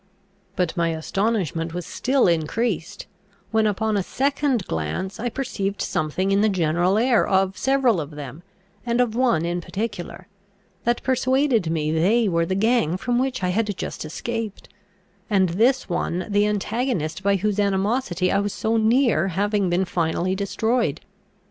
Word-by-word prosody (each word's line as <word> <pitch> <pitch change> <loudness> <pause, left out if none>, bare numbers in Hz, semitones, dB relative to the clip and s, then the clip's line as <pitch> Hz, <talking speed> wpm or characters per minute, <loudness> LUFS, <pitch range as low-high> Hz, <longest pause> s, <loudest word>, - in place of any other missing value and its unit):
But 180 -2 -1
my 170 -2 +1
astonishment 165 -1 -1
was 180 - -4
still 265 -2 +1
increased, 180 +3 -1 0.5
when 220 -1 +3
upon 215 +1 0
a 200 - +2
second 270 0 0
glance 80 - -3
I 240 +2 -1
perceived 210 -6 -3
something 185 +6 -1
in 200 +1 +3
the 215 - +4
general 175 +1 +1
air 235 +1 +3
of 190 0 +2
several 265 -8 +2
of 145 - -6
them, 145 0 -8 0.4
and 235 0 0
of 245 -3 +2
one 240 -10 +2
in 175 +1 -2
particular, 190 -2 -5 0.6
that 240 +1 +1
persuaded 260 - +2
me 155 -2 0
they 205 +9 +3
were 170 -2 +1
the 190 - -1
gang 200 -5 +2
from 245 +4 0
which 255 -6 -1
I 180 - +1
had 205 0 -1
just - - -5
escaped, 220 +6 -5 0.6
and 190 -4 +3
this 240 +9 +2
one 175 0 -2
the 205 0 +2
antagonist 210 - -1
by 200 0 +2
whose 205 +1 -1
animosity 195 -1 +1
I 200 - +2
was 200 0 -2
so 225 +1 0
near 225 - +3
having 200 +1 0
been 180 +2 +1
finally 175 +1 -1
destroyed. 220 +5 0
200 Hz, 155 wpm, -23 LUFS, 175-230 Hz, 0.6 s, the